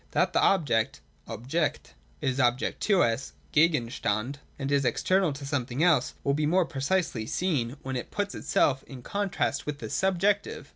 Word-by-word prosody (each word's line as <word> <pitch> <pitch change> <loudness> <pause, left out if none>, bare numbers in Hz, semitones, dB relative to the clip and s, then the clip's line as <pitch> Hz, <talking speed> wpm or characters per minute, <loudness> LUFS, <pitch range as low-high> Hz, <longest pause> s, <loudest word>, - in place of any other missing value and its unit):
That - - +2
the - - +3
object 130 - +2 0.3
{Objekt) 130 +9 -2 0.3
is 135 -2 -1
also 125 - +6
an 120 - +2
object 125 - -4
to 195 -4 +4
us 115 +3 -1 0.2
(Gegenstand) 130 -5 +1 0.2
and 135 0 -3
is 140 -1 +3
external 180 +8 +2
to 140 0 -8
some 135 -3 -1
thing 135 +4 -1
else, 160 -8 +3
will 140 - +2
be 150 +1 +1
more 180 +3 +3
precisely 140 -5 -1
seen, 145 -8 -1
when 130 0 -4
it 125 - -4
puts 200 -1 -2
itself 135 -2 +1
in 130 -3 -10
contrast 195 -7 -1
with 150 -1 -3
the 145 - -7
subjective. 190 +5 0
140 Hz, 180 wpm, -28 LUFS, 125-175 Hz, 0.3 s, also